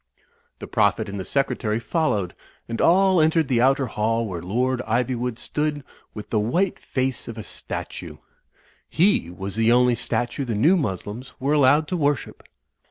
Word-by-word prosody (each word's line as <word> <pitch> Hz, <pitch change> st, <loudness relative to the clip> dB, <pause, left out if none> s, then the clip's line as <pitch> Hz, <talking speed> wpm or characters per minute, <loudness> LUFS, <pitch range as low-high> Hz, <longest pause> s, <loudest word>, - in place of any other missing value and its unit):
The -, -, -8 dB
Prophet -, -, +1 dB
and 100 Hz, 0 st, -5 dB
the -, -, -3 dB
Secretary 115 Hz, -3 st, -1 dB
followed; 115 Hz, -, -1 dB, 0.3 s
and 115 Hz, 0 st, -3 dB
all 190 Hz, 0 st, +4 dB
entered 160 Hz, -1 st, +3 dB
the 120 Hz, -3 st, +2 dB
outer 135 Hz, +1 st, +3 dB
hall 115 Hz, 0 st, -1 dB
where 90 Hz, -4 st, -5 dB
Lord 125 Hz, +7 st, 0 dB
Ivywood 120 Hz, +1 st, -1 dB
stood 150 Hz, +3 st, -2 dB, 0.3 s
with 105 Hz, -, -8 dB
the 110 Hz, -, +2 dB
white 170 Hz, -, 0 dB
face 130 Hz, -1 st, -2 dB
of 115 Hz, -, -7 dB
a 110 Hz, -, -6 dB
statue. -, -, -7 dB, 0.7 s
He 170 Hz, -, +2 dB
was 95 Hz, +2 st, -6 dB
the 115 Hz, +1 st, +3 dB
only 125 Hz, 0 st, +4 dB
statue 120 Hz, +3 st, -2 dB
the 120 Hz, -4 st, -3 dB
New 150 Hz, -, +4 dB
Moslems 110 Hz, -, -4 dB
were 140 Hz, +3 st, 0 dB
allowed 145 Hz, +1 st, +4 dB
to 180 Hz, -, -1 dB
worship. 145 Hz, -3 st, -1 dB
125 Hz, 165 wpm, -23 LUFS, 110-145 Hz, 0.7 s, all